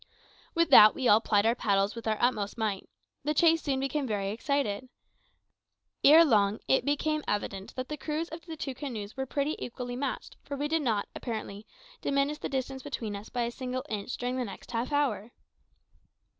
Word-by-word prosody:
'" -, -, -29 dB
With 335 Hz, -2 st, +2 dB
that 215 Hz, -5 st, +9 dB
we 260 Hz, -, 0 dB
all 215 Hz, +1 st, +6 dB
plied 205 Hz, -2 st, +2 dB
our 230 Hz, -, +4 dB
paddles 200 Hz, -3 st, +1 dB
with 230 Hz, -1 st, -7 dB
our 215 Hz, -1 st, +1 dB
utmost 215 Hz, -5 st, 0 dB
might. 210 Hz, -4 st, -2 dB, 0.3 s
The 300 Hz, +2 st, 0 dB
chase 330 Hz, +1 st, +4 dB
soon 270 Hz, -3 st, -1 dB
became 275 Hz, +1 st, -1 dB
very 200 Hz, -3 st, -1 dB
exciting. 255 Hz, 0 st, -1 dB, 1.1 s
Ere 320 Hz, +4 st, +9 dB
long 210 Hz, -6 st, +3 dB
it 265 Hz, -, +3 dB
became 300 Hz, +1 st, 0 dB
evident 200 Hz, -1 st, -3 dB
that 255 Hz, 0 st, -4 dB
the 300 Hz, -, -5 dB
crews 310 Hz, +3 st, -3 dB
of 325 Hz, +1 st, -8 dB
the 320 Hz, -1 st, -7 dB
two 275 Hz, -2 st, -4 dB
canoes 230 Hz, -7 st, -6 dB
were 265 Hz, 0 st, -3 dB
pretty 285 Hz, +4 st, -1 dB
equally 245 Hz, 0 st, -5 dB
matched, 275 Hz, +3 st, -4 dB
for 280 Hz, -, -6 dB
we 290 Hz, +2 st, -1 dB
did 320 Hz, +1 st, +1 dB
not, 220 Hz, -7 st, 0 dB
apparently, 215 Hz, -3 st, -6 dB, 0.3 s
diminish 280 Hz, +2 st, 0 dB
the -, -, -4 dB
distance 265 Hz, 0 st, -3 dB
between 235 Hz, -7 st, -4 dB
us 200 Hz, +2 st, -8 dB
by 245 Hz, -1 st, -1 dB
a 235 Hz, -, -2 dB
single 255 Hz, 0 st, -4 dB
inch 210 Hz, +2 st, -4 dB
during 250 Hz, +1 st, -2 dB
the 255 Hz, -, 0 dB
next 195 Hz, +2 st, -10 dB
half 235 Hz, +4 st, -2 dB
hour. 245 Hz, -7 st, 0 dB
255 Hz, 195 wpm, -29 LUFS, 215-285 Hz, 1.1 s, that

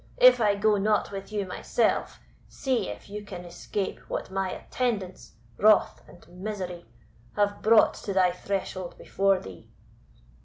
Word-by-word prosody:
If -, -, +7 dB
I 205 Hz, -2 st, +3 dB
go 210 Hz, +1 st, +3 dB
not 210 Hz, +1 st, +1 dB
with 195 Hz, +1 st, -7 dB
you 205 Hz, -2 st, -1 dB
myself, 185 Hz, -, -1 dB, 0.3 s
see 255 Hz, -6 st, -1 dB
if -, -, -8 dB
you 210 Hz, +1 st, -7 dB
can 180 Hz, -3 st, -8 dB
escape 190 Hz, +3 st, -4 dB
what -, -, -4 dB
my 195 Hz, 0 st, -1 dB
attendants, 195 Hz, -, -3 dB, 0.3 s
Wrath 215 Hz, 0 st, +4 dB
and 175 Hz, -, -17 dB
Misery, 180 Hz, -1 st, -6 dB, 0.5 s
have 205 Hz, 0 st, +1 dB
brought 220 Hz, 0 st, +5 dB
to 200 Hz, -, -2 dB
thy 185 Hz, -2 st, +4 dB
threshold 185 Hz, -1 st, -4 dB
before 195 Hz, -1 st, +1 dB
thee." 95 Hz, -, -11 dB
200 Hz, 145 wpm, -27 LUFS, 185-210 Hz, 0.5 s, If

